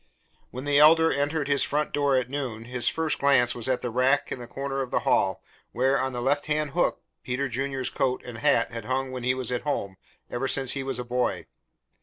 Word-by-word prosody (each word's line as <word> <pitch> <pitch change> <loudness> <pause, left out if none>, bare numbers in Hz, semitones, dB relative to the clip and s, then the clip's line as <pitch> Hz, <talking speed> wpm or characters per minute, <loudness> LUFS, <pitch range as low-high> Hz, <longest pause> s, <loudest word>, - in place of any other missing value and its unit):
When 130 +1 -7
the 145 0 +3
Elder 160 +2 +6
entered 145 +1 -1
his 140 -1 +2
front 150 +1 -1
door 145 -2 +2
at 125 -2 0
noon, 125 -5 -4
his 125 0 -1
first 160 -1 0
glance 135 -4 +4
was 120 -1 -5
at 130 -1 0
the 125 - -2
rack 130 +4 +2
in - - -3
the 120 - -8
corner 135 +2 -3
of 130 - -4
the - - 0
hall, - - +1 0.3
where, 130 +3 +2
on 130 0 -1
the 120 -1 -4
left 145 +3 +1
hand 150 -1 0
hook, 175 - 0 0.2
Peter 130 +2 -2
Junior's 135 +1 -2
coat 130 -2 -1
and 120 -2 -8
hat 145 +3 +2
had 115 -2 -6
hung 130 +1 -1
when 130 -1 -5
he 125 +1 +1
was 130 -2 -3
at 125 - -1
home, 100 -10 -3 0.3
ever 130 +2 -2
since 135 -1 +1
he 140 - -1
was 135 -2 -3
a 125 - -3
boy. 125 +1 -1
135 Hz, 230 wpm, -26 LUFS, 125-145 Hz, 0.3 s, Elder